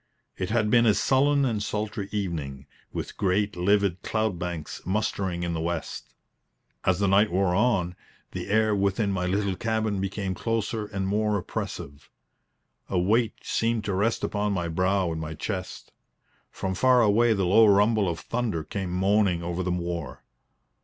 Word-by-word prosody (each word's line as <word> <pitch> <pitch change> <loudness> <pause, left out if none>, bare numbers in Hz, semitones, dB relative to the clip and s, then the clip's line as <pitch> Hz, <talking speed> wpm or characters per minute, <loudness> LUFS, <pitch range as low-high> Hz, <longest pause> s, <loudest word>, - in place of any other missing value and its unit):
It 90 - -3
had 110 -1 +1
been 120 -1 +5
a 105 - +5
sullen 140 +1 +3
and 110 -5 -1
sultry 105 -1 -3
evening, 80 -9 -4 0.3
with - - -6
great 100 +1 +1
livid 95 0 +1
cloud 110 -5 -1
banks 85 -3 -5
mustering 95 -2 -1
in 85 -1 -2
the 80 - -2
west. 85 0 -4 0.7
As 95 -1 +2
the 100 +1 +1
night 100 +2 +4
wore 95 0 +2
on, 90 -4 +1 0.4
the - - -5
air 110 +1 +3
within 100 +1 +1
my 90 -2 -1
little 100 0 0
cabin 110 -1 -1
became 95 0 -2
closer 110 +1 -2
and 95 -2 -3
more 105 +1 +1
oppressive. 70 -5 -6 0.8
A 95 - 0
weight 110 +5 +2
seemed 115 -1 0
to 100 -1 -2
rest 105 +5 0
upon 105 0 -1
my 90 -3 -1
brow 90 +2 +1
and 80 0 -4
my 80 0 -5
chest. 90 +1 -5 0.6
From 95 0 -3
far 125 +4 +4
away 115 +2 +4
the 100 -3 0
low 110 +5 +6
rumble 105 0 +4
of 85 - -4
thunder 115 -9 -2
came 95 +3 -4
moaning 95 -1 +2
over 85 +1 -3
the 90 - -2
moor. 85 -6 -4
100 Hz, 165 wpm, -26 LUFS, 90-110 Hz, 0.8 s, low